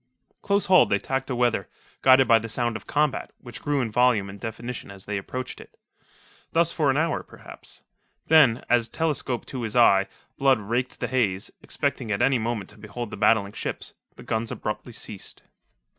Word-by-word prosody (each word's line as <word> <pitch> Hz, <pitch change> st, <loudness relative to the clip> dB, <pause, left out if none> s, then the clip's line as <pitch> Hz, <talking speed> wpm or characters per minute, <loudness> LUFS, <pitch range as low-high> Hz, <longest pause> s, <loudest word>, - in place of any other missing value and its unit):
Close 200 Hz, -1 st, +1 dB
hauled 185 Hz, 0 st, +6 dB
they 100 Hz, -, +3 dB
tacked 135 Hz, +5 st, -3 dB
aweather, 120 Hz, -6 st, +1 dB, 0.3 s
guided 130 Hz, 0 st, +6 dB
by 115 Hz, -2 st, +6 dB
the 115 Hz, +1 st, -7 dB
sound 120 Hz, 0 st, -1 dB
of 110 Hz, -, -8 dB
combat, 150 Hz, -2 st, 0 dB
which 120 Hz, -1 st, -10 dB
grew 145 Hz, -2 st, 0 dB
in 115 Hz, -3 st, -2 dB
volume 110 Hz, -4 st, +2 dB
and 100 Hz, -, -11 dB
definition 115 Hz, +3 st, -6 dB
as 95 Hz, -1 st, -11 dB
they 105 Hz, -, -3 dB
approached 125 Hz, +6 st, -5 dB
it. -, -, -17 dB, 0.8 s
Thus 170 Hz, 0 st, +3 dB
for 155 Hz, -5 st, +1 dB
an 135 Hz, -, +2 dB
hour, 160 Hz, +1 st, 0 dB
perhaps. -, -, -13 dB, 0.4 s
Then, 150 Hz, -7 st, +5 dB
as, 120 Hz, -2 st, +2 dB
telescope 145 Hz, -5 st, -2 dB
to 130 Hz, -, -6 dB
his 110 Hz, -1 st, -4 dB
eye, 100 Hz, -5 st, +5 dB, 0.3 s
Blood 135 Hz, -2 st, +4 dB
raked 120 Hz, +5 st, -3 dB
the -, -, 0 dB
haze, 105 Hz, -7 st, 0 dB
expecting 110 Hz, -, -2 dB
at 100 Hz, -, 0 dB
any 135 Hz, -2 st, +3 dB
moment 110 Hz, -4 st, -3 dB
to 105 Hz, -, -18 dB
behold 105 Hz, +2 st, -6 dB
the -, -, -5 dB
battling 100 Hz, -3 st, +3 dB
ships, -, -, -5 dB, 0.2 s
the -, -, -12 dB
guns 110 Hz, 0 st, -2 dB
abruptly 105 Hz, +3 st, -5 dB
ceased. 105 Hz, -3 st, -8 dB
120 Hz, 185 wpm, -25 LUFS, 105-130 Hz, 0.8 s, hauled